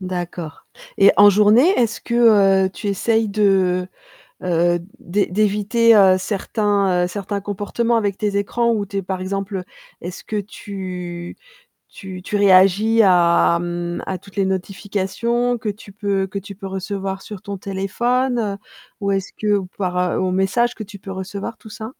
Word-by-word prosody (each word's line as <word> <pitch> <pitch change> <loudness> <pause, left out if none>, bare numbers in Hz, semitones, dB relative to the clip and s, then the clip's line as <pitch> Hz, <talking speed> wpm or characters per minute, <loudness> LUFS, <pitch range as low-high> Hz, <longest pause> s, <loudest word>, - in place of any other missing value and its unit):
D'accord, 175 -3 -6 0.3
et 195 - +7
en 205 0 +8
journée, 210 - +5
est-ce 230 -2 0
que, 205 -5 +4
heu, 190 - -4
tu 210 - -8
essaies 220 +3 +1
de, 190 -3 +1 0.6
heu, 175 -1 +2 0.2
d'é 200 +4 0
d'éviter, 215 +3 +3
heu, 190 -2 +6
certains, 200 -1 0
heu, - - -2
certains 200 +2 -4
comportements 205 +4 -1
avec 205 -3 0
tes 205 -1 -1
écrans, 235 +3 +1
ou 205 -2 -1
tu 200 0 -6
es 195 - 0
par 190 0 -4
exemple 195 0 -3 0.4
est-ce 175 +1 -8
que 215 - -5
tu 185 -4 -6 0.5
tu 190 -2 -9
tu 205 +3 -2
réagis 200 +3 +5
à, 170 -2 +4
mmh, 175 0 -4
à 190 - -2
toutes 200 +3 -18
les 195 - +2
notifications 205 +5 -1
que 220 - -7
tu 205 0 -6
peux 200 -1 -1
que 195 +1 -5
tu 200 +1 -10
peux 195 0 -8
recevoir 195 0 -4
sur 205 -1 -9
ton 200 -2 -6
téléphone, 220 +3 -1 0.4
ou 200 - 0
est-ce 195 -1 -2
que 215 - -5
ou 190 - -4
par, 180 -3 -2 0.2
heu, - - -1
aux 185 -1 0
messages 190 +6 +1
que 220 - -7
tu 200 0 -12
peux 195 - -8
recevoir, 195 +4 -6
tout 220 - -14
ça? 220 +2 -8
200 Hz, 170 wpm, -20 LUFS, 185-210 Hz, 0.6 s, en